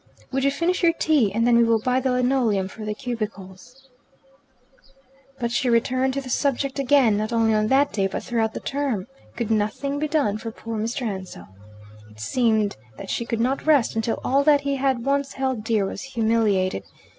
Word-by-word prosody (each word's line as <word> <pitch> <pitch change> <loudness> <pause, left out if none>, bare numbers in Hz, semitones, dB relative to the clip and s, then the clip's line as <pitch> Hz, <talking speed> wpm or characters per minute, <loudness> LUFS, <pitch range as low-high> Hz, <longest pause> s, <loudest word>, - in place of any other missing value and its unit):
"Would 270 0 -1
you 275 - +4
finish 335 +6 0
your 335 -2 +4
tea, 295 -11 +2
and 230 +3 +1
then 240 -1 +4
we 235 - +5
will 230 -1 +3
buy 250 +3 +1
the 260 0 -1
linoleum 250 -6 +1
for 215 +3 -10
the 210 0 -3
cubicles." 225 +2 -7 1.5
But 235 -1 -2
she 245 +1 0
returned 255 +3 +1
to 275 - -1
the 265 - -10
subject 275 +1 0
again, 270 -6 +4
not 215 +2 -2
only 225 -1 +2
on 215 0 +2
that 275 +2 +3
day 195 -2 +1
but - - -5
throughout 225 -2 -1
the - - -4
term. 275 -9 -2 0.3
Could 235 -2 -3
nothing 220 +7 -1
be 305 - 0
done 280 -9 0
for 225 - -5
poor 225 0 -6
Mr. 230 +4 -3
Ansell? 190 - -6 0.6
It 105 0 -18
seemed 220 - +1 0.2
that - - -7
she 235 - -2
could 230 - -2
not 260 +6 -1
rest 285 -9 +3
until 225 +1 -1
all 275 +2 +2
that 290 -1 +4
he 280 -1 -1
had 265 -3 0
once 280 0 0
held 260 -4 -2
dear 220 -3 +1
was 195 - -5
humiliated. 220 - +1
235 Hz, 195 wpm, -23 LUFS, 215-270 Hz, 1.5 s, we